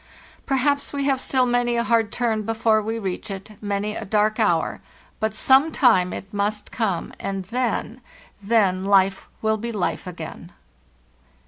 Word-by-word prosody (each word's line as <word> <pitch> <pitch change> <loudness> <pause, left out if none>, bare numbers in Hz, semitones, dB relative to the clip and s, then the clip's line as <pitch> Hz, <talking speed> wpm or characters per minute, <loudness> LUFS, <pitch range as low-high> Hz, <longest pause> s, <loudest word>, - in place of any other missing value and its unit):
Perhaps 280 +2 +1
we 280 -1 -1
have 270 -2 +1
still 260 -1 +2
many 245 -1 +1
a 235 - +1
hard 230 -3 +2
turn 230 -3 0
before 220 0 +2
we 225 +2 -3
reach 195 -3 -4
it, 195 +2 -7
many 205 +1 -2
a - - -4
dark 215 +2 +1
hour; 175 -7 +1 0.4
but 220 0 -1
some 270 +7 +4
time 185 -12 +4
it 195 +2 -7
must 205 +1 -2
come, 205 -7 -2
and 195 -1 -4
then—then 220 -4 -1
life 195 -1 +3 0.2
will 220 0 +2
be 235 +2 -4
hfe 200 -3 -2
again! 170 0 -8
215 Hz, 150 wpm, -23 LUFS, 195-235 Hz, 0.4 s, some